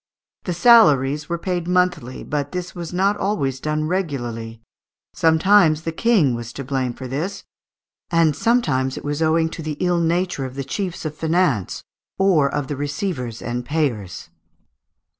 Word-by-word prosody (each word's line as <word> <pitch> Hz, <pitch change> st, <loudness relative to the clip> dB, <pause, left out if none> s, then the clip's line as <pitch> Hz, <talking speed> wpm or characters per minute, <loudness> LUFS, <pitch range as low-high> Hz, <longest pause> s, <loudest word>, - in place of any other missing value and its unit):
The 180 Hz, -, -2 dB
salaries 150 Hz, -, +5 dB
were 170 Hz, -, -1 dB
paid 175 Hz, -1 st, -3 dB
monthly; 180 Hz, -8 st, 0 dB
but 145 Hz, 0 st, -3 dB
this 180 Hz, 0 st, -4 dB
was 170 Hz, -3 st, -6 dB
not 195 Hz, +3 st, +1 dB
always 140 Hz, -11 st, -1 dB
done 155 Hz, +2 st, -1 dB
regularly; 120 Hz, -, -3 dB, 0.5 s
sometimes 160 Hz, -1 st, +4 dB
the 165 Hz, -, -2 dB
King 180 Hz, -, +2 dB
was 120 Hz, 0 st, -5 dB
to 140 Hz, -, -6 dB
blame 130 Hz, -2 st, -2 dB
for 130 Hz, -, -7 dB
this, 155 Hz, +10 st, -4 dB, 0.7 s
and 165 Hz, -3 st, +3 dB
sometimes 145 Hz, -, +1 dB
it -, -, -8 dB
was 145 Hz, +2 st, -2 dB
owing 160 Hz, +1 st, +3 dB
to 165 Hz, -, -7 dB
the 155 Hz, -2 st, -4 dB
ill 180 Hz, -1 st, +1 dB
nature 170 Hz, -3 st, 0 dB
of 130 Hz, 0 st, -8 dB
the 140 Hz, -, -3 dB
chiefs 175 Hz, +6 st, -4 dB
of 155 Hz, -, -3 dB
finance, 160 Hz, -, 0 dB, 0.3 s
or 170 Hz, -8 st, +3 dB
of 145 Hz, -1 st, -2 dB
the 145 Hz, -, -4 dB
receivers 145 Hz, -, -4 dB
and 120 Hz, +1 st, -3 dB
payers. 120 Hz, -, -3 dB
155 Hz, 160 wpm, -21 LUFS, 135-180 Hz, 0.7 s, salaries